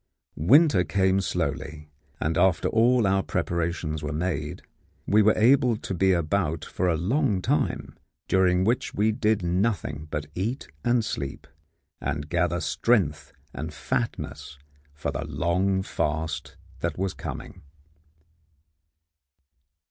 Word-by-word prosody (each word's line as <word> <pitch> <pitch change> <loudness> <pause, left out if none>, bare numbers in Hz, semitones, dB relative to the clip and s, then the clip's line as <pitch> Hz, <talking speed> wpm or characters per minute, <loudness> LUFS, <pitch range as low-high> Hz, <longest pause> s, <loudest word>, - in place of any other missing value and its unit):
Winter 110 - +5
came 95 0 +2
slowly, 75 -4 -3 0.3
and 80 +2 0
after 90 +1 +3
all 120 +1 +4
our 95 0 +3
preparations 85 -3 -2
were 75 -1 -3
made 80 -2 -3 0.4
we 105 +1 +4
were 110 +1 +4
able 125 0 +4
to 100 - -5
be 95 +1 +3
about 80 -2 0
for 90 0 -1
a 80 - +1
long 105 - +1
time, - - -1 0.3
during 90 -1 +3
which 115 +5 0
we 105 +2 +3
did 105 -2 +1
nothing 85 -5 -1
but 75 -1 -3
eat 115 +9 -3 0.2
and 120 -2 +2
sleep, 70 -10 -4 0.6
and 75 +1 -3
gather 85 +1 +1
strength 75 - +1 0.2
and 80 +3 -6
fatness 70 - -3 0.4
for 75 - -3
the - - -3
long 95 +2 0
fast 80 -2 -3 0.2
that - - -2
was 95 0 -1
coming. 90 - -7
90 Hz, 125 wpm, -26 LUFS, 80-105 Hz, 0.6 s, Winter